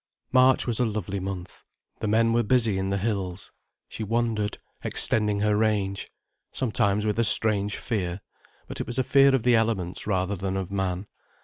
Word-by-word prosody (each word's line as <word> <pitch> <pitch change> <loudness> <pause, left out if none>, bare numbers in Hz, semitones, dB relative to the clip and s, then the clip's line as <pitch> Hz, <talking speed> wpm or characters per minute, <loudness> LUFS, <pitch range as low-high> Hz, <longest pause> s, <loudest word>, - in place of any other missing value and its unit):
March 130 0 +4
was 120 -3 -1
a - - +3
lovely 100 -3 -3
month. 95 -1 -7 0.4
The 110 - -3
men 115 +2 +2
were 120 - +3
busy 115 -4 +2
in 95 0 -2
the 100 - 0
hills. 95 -3 -3 0.4
She 110 - -7
wandered, 110 -2 -1 0.3
extending 105 -2 0
her 105 0 +2
range. 105 -2 -1 0.4
Sometimes 105 -4 0
with 105 +1 -1
a - - +4
strange 105 -2 +4
fear. 95 -5 -3 0.5
But - - -5
it - - -5
was 120 +1 -3
a 130 - +2
fear 135 +1 +5
of 125 - -1
the 125 -1 +4
elements 110 -7 -1
rather 95 0 0
than 95 0 -3
of 95 -1 -4
man. 95 -1 -2
105 Hz, 180 wpm, -25 LUFS, 95-115 Hz, 0.5 s, fear